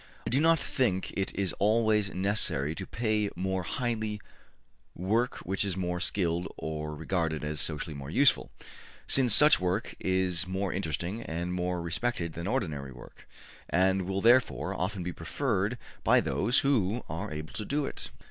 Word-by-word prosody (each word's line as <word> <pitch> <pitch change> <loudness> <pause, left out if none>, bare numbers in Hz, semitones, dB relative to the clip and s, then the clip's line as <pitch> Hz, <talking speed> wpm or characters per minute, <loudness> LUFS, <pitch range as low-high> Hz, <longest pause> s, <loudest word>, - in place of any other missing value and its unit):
I - - -2
do 130 - +3
not 165 +1 +5
think 110 -9 -1
it 95 - -1
is 95 -3 0
always 105 -1 +3
necessary 90 -7 +1
to 95 +3 -7
pay 110 -3 0
more 95 +1 -1
highly 110 +1 -2 0.8
work 110 +7 0
which 95 +3 0
is 95 -2 -2
more 90 -1 -1
skilled 90 -1 0
or 75 -1 -4
regarded 80 -1 -1
as 75 0 -2
socially 80 0 -2
more 70 -1 -7
useful, 140 - +4 0.6
since 130 -3 +2
such 150 +8 +7
work 90 +4 -1
is 95 -1 +1
more 95 0 -2
interesting 90 +4 -3
and 85 -1 -3
more 90 -1 -1
respected 85 0 -2
than 85 +2 -5
ordinary 80 - -2
work, 60 -1 -14 0.4
and 95 +1 +2
will 95 0 -1
therefore 120 +3 +3
often 95 0 -2
be 90 0 -3
preferred 105 - -1 0.3
by - - +5
those 120 +6 +2
who 120 -5 +1
are 90 +6 -4
able 75 0 -6
to 110 - -4
do 145 +7 -1
it. - - -6
95 Hz, 160 wpm, -29 LUFS, 85-110 Hz, 0.8 s, such